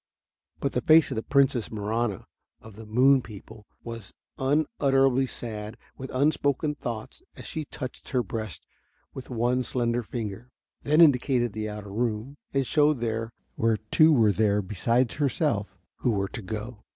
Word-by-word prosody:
But 140 - -1
the 125 - -1
face 160 +4 +5
of - - -2
the 110 - -1
Princess 140 -3 +2
Marahna 110 -1 -2 0.3
of 110 -2 -14
the 110 0 -11
moon 130 +5 +5
people 110 -1 -12 0.2
was 115 -4 -8 0.2
unutterably 135 - +2
sad 110 -2 -6 0.2
with 130 0 -8
unspoken 145 +1 +1
thoughts 115 - -6
as - - -10
she 155 -2 -4
touched 130 -2 -7
her 125 -2 +1
breast 110 -3 -6 0.5
with 130 - -9
one 125 +1 +1
slender 120 -1 -1
finger, 115 0 -6 0.3
then 150 +3 +4
indicated 125 -6 +4
the 110 0 -3
outer 105 -1 -7
room 120 +4 -2
and 135 -1 +1
showed 150 +2 +3
there 115 -1 -2 0.2
were 115 -1 +2
two 115 - +4
there 105 -1 +1
beside 115 +6 +1
herself 140 -6 -1 0.2
who 125 - 0
were 100 -3 0
to - - -6
go. 110 +3 -6
120 Hz, 150 wpm, -26 LUFS, 110-135 Hz, 0.5 s, face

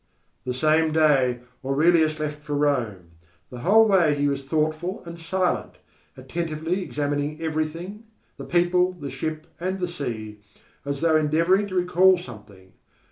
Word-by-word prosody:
The 125 - -2
same 155 +3 +2
day 135 -6 +3 0.2
Aurelius 155 +3 +3
left 150 0 -4
for 150 0 -4
Rome. 115 - -1 0.4
The 125 - -8
whole 220 - +5
way 175 -7 +4
he 145 0 +1
was 140 -1 -2
thoughtful 155 +6 -2
and 170 0 -9
silent, 180 +2 -1 0.4
attentively 160 +6 -3
examining 145 -2 -2
everything, 165 +6 -4 0.3
the - - -8
people, 180 +1 +2
the 145 -7 -7
ship, 155 +3 -4
and 185 +2 -2
the 180 - -1
sea, 110 -10 -6 0.5
as 140 -1 -3
though 165 -1 +3
endeavouring 165 +6 +2
to 185 - -6
recall 180 +1 +4
something. 105 - -13
155 Hz, 140 wpm, -24 LUFS, 140-175 Hz, 0.5 s, whole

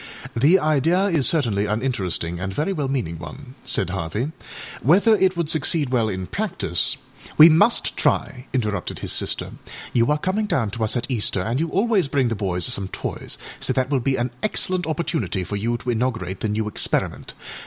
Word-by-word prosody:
â 115 - -2
âThe 160 +8 +6
idea 155 +5 +2
is 160 -7 +3
certainly 110 -10 0
an 110 +3 -1
interesting 90 -9 -1
and 95 +1 -3
very 155 - -1
well 150 -6 -2
meaning 100 - -2
one,â 130 - -10
said 90 -2 -1
Harvey; 100 - -3 0.5
âwhether 200 - +4
it 185 -2 +3
would 170 -2 0
succeed 155 -2 +1
well 120 -4 +1
in 95 -2 -4
practiceââ 180 - -1 0.4
âWe 160 +2 +10
must 205 +9 +3
try,â 125 -1 0
interrupted 105 -7 -2
his - - -3
sister; - - -1 0.4
âyou 120 +2 +3
are 150 - +3
coming 195 +7 -1
down 115 - 0
to 115 +1 -3
us 110 +3 0
at 120 - -1
Easter, 105 -5 0
and 115 +7 -1
you 165 +1 0
always 200 -2 +2
bring 135 -3 +1
the 115 - -1
boys 90 -4 0
some 100 -1 0
toys, - - -5 0.2
so - - 0
that 130 +2 0
will 135 - +2
be 135 +2 0
an 120 0 -1
excellent 185 -4 +1
opportunity 160 - -2
for 95 +3 -5
you 115 +4 -1
to 125 +1 -3
inaugurate 115 -6 -2
the 110 - -2
new 105 +1 -1
experiment. 105 - -2
125 Hz, 195 wpm, -22 LUFS, 105-160 Hz, 0.5 s, âWe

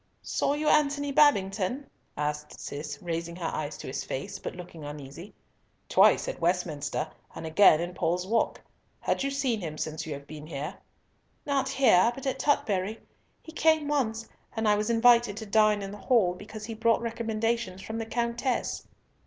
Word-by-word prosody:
"Saw 285 - 0
you 305 +1 -2
Antony 285 -1 +3
Babington?" 255 -3 +3 0.3
asked 150 0 -3
Cis, 145 0 -6
raising 170 0 -3
her 175 -1 -5
eyes 150 -1 -3
to - - -9
his 130 - -4
face, 135 - -5
but - - -6
looking 175 -3 -10
uneasy. 145 +5 -9 0.5
"Twice, - - +5
at - - -5
Westminster, 170 -4 -1 0.3
and - - -6
again 160 0 +6
in 175 +1 -3
Paul's 175 +1 0
Walk. 225 +3 +1 0.4
Had - - -1
you 275 - 0
seen 270 -6 -1
him 155 -3 -5
since 155 +1 -4
you 155 - -3
have 140 0 -8
been 150 0 -9
here?" 150 +3 -4 0.7
"Not 275 -2 0
here, 235 -6 +5
but 270 - -8
at 265 - -1
Tutbury. 220 -8 +1 0.4
He 320 - -10
came 315 -2 +3
once, 225 -6 -1 0.3
and 220 -1 +1
I 210 - +6
was 210 +2 0
invited 235 -2 +5
to 220 - -5
dine 210 0 +3
in 195 - -5
the 205 - -9
hall, 215 -8 +3
because 210 +3 -9
he 225 - -5
brought 230 +1 +2
recommendations 225 -4 -2
from 220 +1 -4
the 225 - -4
Countess." 235 +2 -1
210 Hz, 175 wpm, -28 LUFS, 170-240 Hz, 0.7 s, again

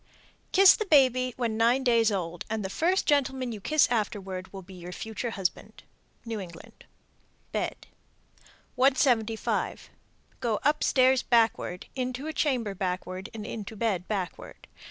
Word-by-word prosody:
Kiss 385 0 +8
the 435 - -4
baby 255 -5 +4
when 230 -3 -1
nine 240 +4 +3
days 230 -3 +3
old, 175 -3 -3
and 215 -2 -2
the 190 - -4
first 360 - +1
gentleman 265 -3 +1
you 215 -3 -7
kiss 305 +7 +3
afterward 195 -4 -3
will 195 -1 -9
be 190 +2 -13
your 180 -1 -9
future 220 +5 -5
husband. 195 -5 -4 0.4
New 225 -2 -4
England. 170 -4 -11 0.7
BED. - - -3 0.9
175. 245 -4 +1 0.5
Go 225 -3 -1
upstairs 265 -3 +3
backward, 225 -6 +1
into 255 +1 -3
a 315 - -4
chamber 250 -11 0
backward, 185 +1 -4
and 220 -2 -7
into 220 0 -6
bed 200 -5 -1
backward. 190 -5 -5
225 Hz, 135 wpm, -27 LUFS, 195-255 Hz, 0.9 s, Kiss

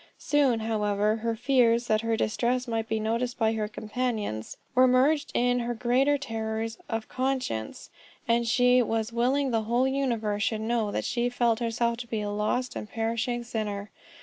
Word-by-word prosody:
Soon, 275 -6 +2
however, 210 -1 +1
her 230 0 -2
fears 240 -1 +3
that 215 -2 +2
her 230 0 0
distress 245 +4 0
might 225 -1 -2
be 220 - 0
noticed 230 +3 -1
by 225 -2 +2
her 215 -1 -1
companions, 215 - -3 0.2
were 255 +1 +6
merged 270 +4 +3
in 245 0 +2
her 240 0 -2
greater 255 +5 +2
terrors 225 -3 -4
of 225 -1 -3
conscience, 255 - -3 0.4
and 235 0 +2
she 250 +1 +4
"was 225 0 -1
willing 260 +3 +1
the 225 -1 +1
whole 240 +4 +2
universe 235 -6 -1
should 220 0 0
know 225 -1 0
that - - -2
she 240 0 0
felt 235 -2 +1
herself 235 0 0
to 240 0 -7
be 225 -2 -2
a 205 0 -3
lost 215 +5 -1
and 210 - -6
perishing 230 +2 -2
sinner." 210 -3 -4
230 Hz, 175 wpm, -27 LUFS, 220-250 Hz, 0.4 s, were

